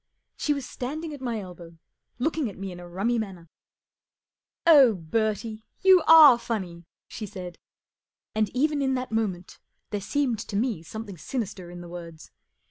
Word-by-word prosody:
She 295 - -1
was 275 -3 -5
standing 305 +5 -5
at 285 - -9
my 235 -4 -2
elbow, 175 -3 -11 0.4
looking 300 0 -1
at 195 - -11
me 195 0 -5
in 175 - -9
a 175 - -10
rummy 220 +7 0
manner. 185 -6 -7 0.6
*' - - -68
Oh, 260 -7 +7
Bertie, 215 +5 -2 0.2
you 375 -2 +7
are 305 -7 +9
funny! 185 -8 -4
" - - -68
she 215 - -7
said. 180 -2 -8 0.7
And 215 -1 +1
even 290 +3 0
in 265 -1 +1
that 255 -1 -4
moment 195 -6 -3 0.3
there 205 -1 -2
seemed 255 0 0
to 205 - -6
me 220 -4 0
something 205 0 -8
sinister 190 -7 -5
in 175 0 -9
the 175 - -9
words. 170 -2 -10
220 Hz, 170 wpm, -26 LUFS, 180-255 Hz, 0.7 s, are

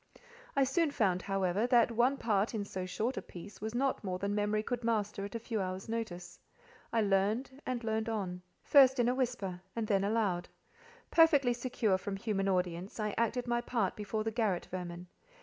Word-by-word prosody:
I 275 - +4
soon 295 +5 +2
found, 190 -9 +1
however, 195 +3 0
that 240 -1 +4
one 245 +4 +2
part 215 -2 +1
in 205 -2 -2
so 185 -2 -5
short 230 +7 -2
a - - -1
piece 190 +3 -11
was 220 +2 -4
not 265 -1 0
more 185 -2 -2
than 200 +2 -2
memory 210 +1 0
could 245 +1 -3
master 210 -3 0
at 205 - -8
a - - -1
few 225 -2 -2
hours' 185 +2 -4
notice. 220 -6 -5 0.5
I 230 - +2
learned 215 +7 0
and 245 -2 -2
learned 220 0 -1
on, 190 -5 -3 0.2
first 270 -2 +6
in 240 - +3
a 250 - +3
whisper, 220 -9 -2
and 230 -1 -1
then 195 -2 +2
aloud. 200 -4 0 0.6
Perfectly 290 -7 +5
secure 235 -5 0
from 195 +1 -4
human 195 -1 -1
audience, 180 +2 -1
I 210 -1 -1
acted 235 +2 0
my 240 0 0
part 230 -6 -1
before 215 +1 -3
the 225 - -1
garret 215 -6 0
vermin. 175 -1 -5
215 Hz, 190 wpm, -32 LUFS, 195-240 Hz, 0.6 s, first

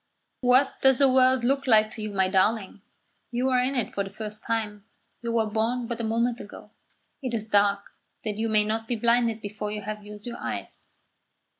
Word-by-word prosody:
"What 255 +2 +3
does 265 -1 +5
the 275 - +5
world 255 -1 +4
look 275 +2 +1
like 215 -2 +5
to 220 - -7
you, 215 - -3
my 190 -2 +1
darling? 195 +1 +1 0.5
You 250 +2 0
are 255 -1 +3
in 255 +2 0
it 245 - -2
for 200 - -1
the 195 - -7
first 210 +1 -8
time. 215 -3 -2 0.4
You 235 -1 -3
were 230 -1 +2
born 225 +3 -1
but 235 0 -4
a - - -4
moment 235 +2 0
ago. - - -11 0.5
It 255 -3 -2
is 220 -1 -3
dark, 200 -1 +2 0.3
that 215 -1 -3
you 225 0 0
may 215 -1 +4
not 220 +1 -2
be 240 - -1
blinded 235 0 +2
before 210 0 -5
you 210 0 -5
have 210 0 -5
used 210 0 -10
your 240 - -6
eyes. - - -6
225 Hz, 205 wpm, -26 LUFS, 210-245 Hz, 0.5 s, does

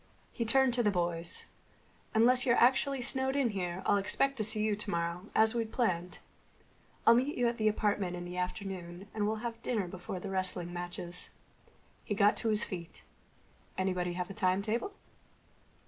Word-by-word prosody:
He 230 - -3
turned 265 +2 +4
to 240 - +3
the 210 - +3
boys. 170 -2 -3 0.7
"Unless 250 +3 +5
you're 235 -2 +3
actually 265 +1 +3
snowed 265 +2 +2
in 275 -4 +2
here 185 -2 -3
I'll 205 - +4
expect 275 +7 +1
to 215 - 0
see 215 0 +3
you 215 -1 +1
tomorrow, 175 -2 -3
as 220 +1 +4
we'd 230 -2 -2
planned. 180 -7 -1 0.9
I'll 230 - +8
meet 260 +5 +1
you 245 -1 +2
at 235 0 -1
the 215 - +2
apartment 205 -4 0
in 175 0 -6
the 175 0 -7
afternoon, 180 0 -5
and 210 -1 0
we'll 220 +2 -3
have 230 -1 -5
dinner 215 -7 -1
before 180 +1 -6
the 195 +2 -6
wrestling 185 -2 -1
matches." 175 0 -4 0.7
He 205 - -3
got 205 +1 +4
to 230 - 0
his 215 +1 +3
feet. 170 -3 -7 0.7
"Anybody 180 -2 -1
have 180 +2 -4
a - - -6
timetable?" 200 - 0
205 Hz, 175 wpm, -32 LUFS, 180-235 Hz, 0.9 s, I'll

